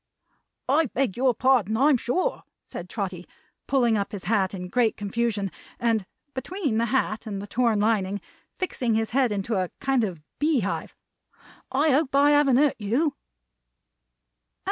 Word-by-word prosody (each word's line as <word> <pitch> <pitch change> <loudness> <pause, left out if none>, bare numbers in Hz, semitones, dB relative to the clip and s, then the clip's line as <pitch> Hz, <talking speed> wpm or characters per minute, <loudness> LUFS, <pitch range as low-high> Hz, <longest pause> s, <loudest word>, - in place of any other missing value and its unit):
"I 295 +4 +3
beg 255 -4 -1
your 255 -1 +2
pardon, 235 -5 +2
I'm 280 +3 +5
sure!" 350 - -1 0.2
said 175 +1 -8
Trotty, 185 -4 -4 0.4
pulling 240 -5 +3
up 200 - -4
his 200 - -6
hat 200 -3 +1
in 180 -1 -6
great 230 +3 +1
confusion, 205 -1 -1 0.3
and 225 -5 +1 0.3
between 275 - -2
the 235 - +1
hat 230 -3 -1
and 200 -2 -4
the 200 - -6
torn 230 0 +1
lining, 205 -2 +1 0.4
fixing 250 -11 -1
his 225 +1 0
head 255 -2 +2
into 205 +1 -1
a 180 - -5
kind 270 -3 +1
of 185 -6 -3 0.2
bee 295 -4 +2
hive. 200 0 -3 0.8
"I 290 +4 +3
hope 275 0 +2
I 285 +1 +5
haven't 290 -4 +4
hurt 290 0 +3
you." 265 +9 0
235 Hz, 155 wpm, -25 LUFS, 205-270 Hz, 0.8 s, I'm